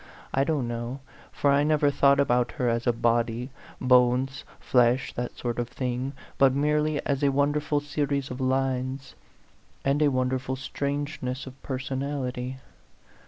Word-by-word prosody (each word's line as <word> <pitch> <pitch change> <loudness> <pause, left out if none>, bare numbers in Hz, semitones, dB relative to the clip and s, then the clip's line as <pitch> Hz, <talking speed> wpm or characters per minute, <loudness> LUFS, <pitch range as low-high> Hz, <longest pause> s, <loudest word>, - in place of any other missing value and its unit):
I 135 - +3
don't 140 -5 0
know, 120 +3 -4 0.3
for 140 - +2
I 140 +1 +4
never 150 -1 +3
thought 140 0 +4
about 125 -3 +2
her 125 -5 -1
as 115 0 0
a - - +6
body 120 +2 0 0.3
bones, 125 +1 +3 0.2
flesh, 125 +1 +2
that 120 0 -4
sort 120 -1 -3
of 120 0 -2
thing 125 +2 -3 0.3
but 135 -1 +5
merely 150 +1 +1
as 140 -1 0
a 140 - +4
wonderful 145 +1 +1
series 145 -2 -2
of 125 +1 -5
lines, 130 0 -1 0.7
and 140 +2 +2
a 150 - +5
wonderful 130 0 -1
strangeness 140 0 -3
of 130 0 -12
personality. 130 -1 -3
130 Hz, 145 wpm, -27 LUFS, 125-140 Hz, 0.7 s, a